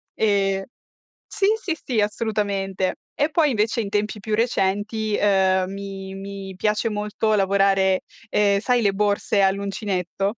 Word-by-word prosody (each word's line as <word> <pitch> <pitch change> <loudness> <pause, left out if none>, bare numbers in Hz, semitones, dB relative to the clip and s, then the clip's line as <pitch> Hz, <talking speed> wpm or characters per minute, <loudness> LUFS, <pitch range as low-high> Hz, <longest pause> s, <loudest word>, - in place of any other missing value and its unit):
E 195 -2 +1 0.6
sì, 395 - 0
sì, 345 -7 -2
sì, 240 -4 0
assolutamente. 205 -3 -1 0.2
E 290 +2 +1
poi 305 -2 +3
invece 225 0 +1
in 205 - -3
tempi 210 +1 -1
più 215 +1 -2
recenti 215 -1 0
ehm, 190 -2 +2
mi 195 -1 -7
mi 195 0 -7
piace 210 +3 0
molto 210 0 -1
lavorare 195 -1 +3 0.3
ehm, 200 -2 +2
sai 245 +2 +2
le 200 -2 +3
borse 205 0 +1
all'uncinetto? 195 -1 -1
200 Hz, 135 wpm, -23 LUFS, 195-215 Hz, 0.6 s, poi